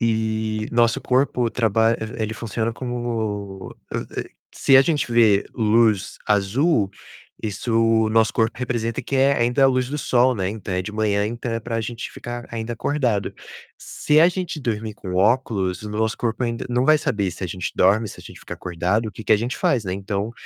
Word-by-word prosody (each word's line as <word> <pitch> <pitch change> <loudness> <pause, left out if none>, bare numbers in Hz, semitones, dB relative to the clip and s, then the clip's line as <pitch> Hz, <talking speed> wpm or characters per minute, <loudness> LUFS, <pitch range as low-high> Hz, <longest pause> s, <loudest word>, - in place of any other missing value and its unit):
E 110 -1 -1
nosso 115 -1 +2
corpo 125 -2 +1
traba 115 0 +2
e 110 +1 -5
ele 110 0 -2
funciona 115 +1 -3
como 110 -6 -4 0.2
eh, - - -4
eh, - - -16 0.2
se 135 - +5
a - - +9
gente 145 -4 0
vê 110 -4 +4
luz 110 -2 +2
azul, 105 - +2 0.5
isso 110 +2 -3
o 115 -1 +3
nosso 110 0 +3
corpo 115 0 0
representa 120 -3 -2
que 140 - -2
é 135 +1 +4
ainda 120 +3 +3
a - - +8
luz 130 -1 +1
do 150 +2 -3
sol, 125 -2 +3
né. 95 -2 -1
Então 100 -2 -5
é 90 - 0
de 105 +3 -7
manhã, 105 -1 +1
então 120 +2 -4
é 115 - -1
para 115 0 -3
gente 115 +2 -5
ficar 120 +1 -7
ainda 115 0 -4
acordado. 115 -5 -1 0.4
Se 150 +1 +1
a 170 - +7
gente 180 -3 -4
dormir 110 -4 -3
com 95 -3 -7
óculos, 100 -3 +1
o 105 - -6
nosso 110 +1 -1
corpo 120 +1 -1
ainda 115 -1 -3
não 125 +1 +1
vai 155 +2 +6
saber 130 -11 -1
se 90 - -10
a - - 0
gente 90 +2 -4
dorme, 110 +3 +3
se - - -10
a - - -13
gente - - -12
fica - - -8
acordado, 90 +6 -1
o - - -9
que 110 - -10
que - - +3
a - - +6
gente 120 +3 -3
faz, 125 -5 +1
né. 90 - -3
Então, 100 +2 -3
115 Hz, 205 wpm, -22 LUFS, 105-120 Hz, 0.5 s, a